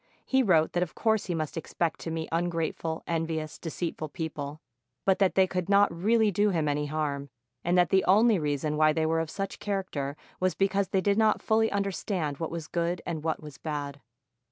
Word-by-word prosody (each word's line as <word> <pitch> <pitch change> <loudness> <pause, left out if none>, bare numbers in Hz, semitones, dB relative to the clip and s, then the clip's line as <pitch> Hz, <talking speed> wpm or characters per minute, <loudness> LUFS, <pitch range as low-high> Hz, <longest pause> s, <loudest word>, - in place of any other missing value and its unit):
He 265 0 +3
wrote 170 -9 +3
that 175 - +1
of 180 - -2
course 220 -2 +1
he 175 - -1
must 155 -2 -3
expect 165 0 -2
to - - -5
meet 160 0 -3
ungrateful, 165 -1 -1
envious, 160 -2 -2
deceitful 165 -1 -4
people; 150 -2 -5 0.5
but 190 0 +3
that 195 -2 +3
they 190 - +6
could 180 0 -3
not 200 -2 +5
really 215 +4 +3
do 205 +2 +2
him 165 -5 0
any 145 0 0
harm, 145 -2 -2 0.3
and 175 +1 +2
that 175 -1 +4
the 190 -1 +4
only 215 +1 +5
reason 150 0 -1
why 155 0 +5
they 160 0 +1
were 165 +1 +1
of 165 -1 -2
such 195 +2 -4
charac 195 -2 -2
ter 140 -1 -3 0.2
was 185 0 +1
because 195 0 +1
they 190 - +1
did 200 +3 +2
not 215 -1 +4
fully 220 0 +2
understand 195 -6 -2
what 165 - -2
was 165 -2 -5
good 170 +1 -1
and 160 -3 -4
what 160 -1 -2
was 150 -2 -10
bad. 145 -2 -4
170 Hz, 205 wpm, -28 LUFS, 155-195 Hz, 0.5 s, they